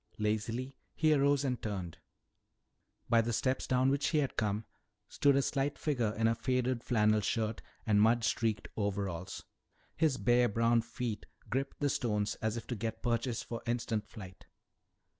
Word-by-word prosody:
Lazily 115 Hz, +5 st, -2 dB, 0.2 s
he 155 Hz, -1 st, +4 dB
arose 140 Hz, -1 st, +3 dB
and 125 Hz, -2 st, -1 dB
turned. 95 Hz, -6 st, -4 dB, 1.1 s
By 115 Hz, -1 st, +5 dB
the 115 Hz, +1 st, -2 dB
steps 130 Hz, +3 st, 0 dB
down 130 Hz, +1 st, +3 dB
which 140 Hz, +1 st, +1 dB
he 160 Hz, -, +1 dB
had 140 Hz, -3 st, 0 dB
come 105 Hz, 0 st, -1 dB, 0.4 s
stood 140 Hz, -1 st, +3 dB
a 140 Hz, -, +3 dB
slight 140 Hz, +2 st, -1 dB
figure 125 Hz, -8 st, 0 dB
in 115 Hz, 0 st, +3 dB
a 115 Hz, -, +3 dB
faded 125 Hz, 0 st, 0 dB
flannel 110 Hz, -2 st, +3 dB
shirt 110 Hz, +1 st, -1 dB, 0.2 s
and 105 Hz, -2 st, +4 dB
mud 115 Hz, +2 st, +4 dB
streaked 110 Hz, -1 st, 0 dB
overalls. 95 Hz, -4 st, -3 dB, 0.5 s
His 155 Hz, -5 st, +2 dB
bare 120 Hz, -1 st, +3 dB
brown 115 Hz, +2 st, +3 dB
feet 115 Hz, -2 st, -5 dB, 0.2 s
gripped 135 Hz, +5 st, -2 dB
the 145 Hz, -, +3 dB
stones 105 Hz, -5 st, 0 dB
as 110 Hz, +1 st, -1 dB
if 115 Hz, -, -6 dB
to 125 Hz, -, -3 dB
get 110 Hz, +1 st, -4 dB
purchase 120 Hz, 0 st, 0 dB
for 115 Hz, -, -6 dB
instant 115 Hz, -3 st, -1 dB
flight. 95 Hz, -5 st, -11 dB
115 Hz, 160 wpm, -32 LUFS, 110-130 Hz, 1.1 s, By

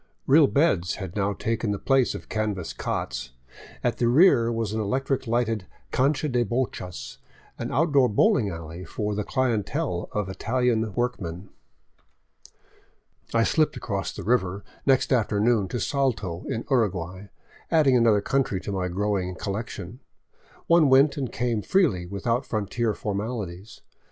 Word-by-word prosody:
Real 145 Hz, +1 st, +6 dB
beds 115 Hz, -, +2 dB
had 95 Hz, -2 st, -7 dB
now 100 Hz, 0 st, 0 dB
taken 115 Hz, +2 st, -2 dB
the 100 Hz, -, 0 dB
place 135 Hz, +3 st, +2 dB
of -, -, -8 dB
canvas 105 Hz, -5 st, -2 dB
cots; 65 Hz, 0 st, -4 dB, 0.5 s
at -, -, 0 dB
the 120 Hz, -, +2 dB
rear 120 Hz, -4 st, +5 dB
was 115 Hz, -2 st, -2 dB
an 110 Hz, -, -1 dB
electric 130 Hz, +4 st, -1 dB
lighted 115 Hz, -4 st, 0 dB, 0.2 s
cancha 140 Hz, +3 st, +1 dB
de 125 Hz, -3 st, +1 dB
bochas, 115 Hz, -6 st, -4 dB, 0.4 s
or -, -, -3 dB
outdoor 145 Hz, -5 st, +3 dB
bowling 120 Hz, -, +3 dB
alley 85 Hz, 0 st, -7 dB
for 105 Hz, +2 st, -3 dB
the 105 Hz, +1 st, -2 dB
clientele 120 Hz, -4 st, -1 dB
of 105 Hz, -2 st, -2 dB
Italian 115 Hz, +2 st, 0 dB
workmen. 100 Hz, -7 st, -3 dB, 1.8 s
I 115 Hz, -, +3 dB
slipped 155 Hz, +6 st, +1 dB
across 100 Hz, -3 st, -3 dB
the -, -, -8 dB
river 100 Hz, -4 st, 0 dB, 0.2 s
next 135 Hz, 0 st, +3 dB
afternoon 110 Hz, -2 st, +2 dB
to 120 Hz, -, -3 dB
Salto, 110 Hz, -13 st, -1 dB
in 115 Hz, -, -3 dB
Uruguay, 95 Hz, -5 st, 0 dB, 0.4 s
add 160 Hz, -2 st, +4 dB
ing 135 Hz, -2 st, +5 dB
another 115 Hz, -4 st, +4 dB
country 130 Hz, -4 st, 0 dB
to -, -, -5 dB
my 95 Hz, -2 st, -1 dB
growing 95 Hz, 0 st, -1 dB
collection. 105 Hz, +2 st, -5 dB, 0.7 s
One 170 Hz, -4 st, +5 dB
went 135 Hz, +2 st, +5 dB
and 130 Hz, -5 st, -3 dB
came 120 Hz, -3 st, -1 dB
freely, 110 Hz, -, +1 dB
without 115 Hz, +6 st, -1 dB
frontier 110 Hz, +1 st, -1 dB
formalities. 105 Hz, -2 st, -5 dB
110 Hz, 140 wpm, -25 LUFS, 100-125 Hz, 1.8 s, Real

